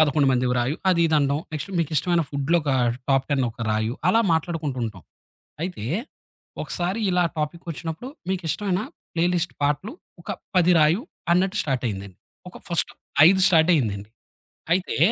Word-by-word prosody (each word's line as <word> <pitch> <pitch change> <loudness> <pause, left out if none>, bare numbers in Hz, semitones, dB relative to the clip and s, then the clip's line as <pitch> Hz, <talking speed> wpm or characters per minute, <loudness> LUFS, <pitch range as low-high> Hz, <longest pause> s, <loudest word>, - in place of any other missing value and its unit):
11 150 -2 +4
మందివి 125 0 +1
రాయు 125 +6 0
అది 180 -2 +3
ఇది 160 - +1
అనడం. 140 0 +1
నెక్స్ట్ 155 +5 -4
మీకు 165 -2 0
ఇష్టమైన 170 +3 +2
ఫుడ్‌లో 140 +4 +1
ఒక 145 - -1 0.4
టాప్ 135 -1 +3
10 140 -2 +2
ఒక 115 0 -6
రాయు. 110 +2 0
అలా 225 +5 +4
మాట్లాడుకుంటూ 160 -4 -1
ఉంటాం. 105 -5 -6 0.6
అయితే 180 - -4 0.8
ఒకసారి 185 +5 -2
ఇలా 180 0 +3 0.2
టాపిక్ 155 +3 -3
వచ్చినప్పుడు 165 - -5 0.2
మీకిష్టమైన 185 +1 -1 0.3
ప్లే 165 0 +2
లిస్ట్ 175 0 -1
పాటలు 150 - 0 0.3
ఒక 170 - -15 0.3
10 180 0 +5
రాయు 155 +6 +4 0.3
అన్నట్టు 185 +3 +2
స్టార్ట్ 135 -3 -2
అయిందండి. 100 -3 -6 0.3
ఒక - - -13
ఫర్స్ట్ 170 -2 0 0.4
5 190 +1 +4
స్టార్ట్ 165 -1 +4
అయిందండి. 105 -7 -1 0.6
అయితే 185 +1 -1
155 Hz, 155 wpm, -24 LUFS, 135-175 Hz, 0.8 s, 10